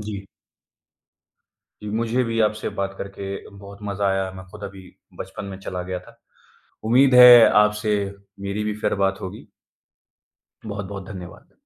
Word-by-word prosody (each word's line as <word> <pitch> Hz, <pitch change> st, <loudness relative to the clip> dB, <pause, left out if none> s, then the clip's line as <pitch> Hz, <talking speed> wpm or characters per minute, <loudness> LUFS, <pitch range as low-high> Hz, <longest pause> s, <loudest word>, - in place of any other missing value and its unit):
जी। 105 Hz, -2 st, -6 dB, 1.6 s
जी, 105 Hz, -, -7 dB
मुझे 115 Hz, +3 st, 0 dB
भी 115 Hz, 0 st, -2 dB
आपसे 105 Hz, 0 st, 0 dB
बात 95 Hz, 0 st, -2 dB
करके 100 Hz, 0 st, -6 dB
बहुत 100 Hz, 0 st, -12 dB
मज़ा 100 Hz, -1 st, -2 dB
आया। 95 Hz, -1 st, 0 dB
मैं 95 Hz, -1 st, -10 dB
खुद 105 Hz, 0 st, -12 dB
अभी 95 Hz, -1 st, -10 dB, 0.3 s
बचपन -, -, -7 dB
में 95 Hz, -1 st, -7 dB
चला 90 Hz, -2 st, -5 dB
गया 90 Hz, 0 st, -4 dB
था। 115 Hz, 0 st, -18 dB, 0.7 s
उम्मीद 130 Hz, +3 st, +4 dB
है 125 Hz, -2 st, +10 dB
आपसे 105 Hz, 0 st, +3 dB, 0.5 s
मेरी 100 Hz, +2 st, -3 dB
भी 105 Hz, 0 st, -2 dB
फिर -, -, 0 dB
बात 95 Hz, 0 st, 0 dB
होगी। 95 Hz, -, -8 dB, 1.2 s
बहुत-बहुत 100 Hz, -2 st, -6 dB
धन्यवाद। 90 Hz, -4 st, -10 dB
100 Hz, 145 wpm, -23 LUFS, 95-105 Hz, 1.6 s, है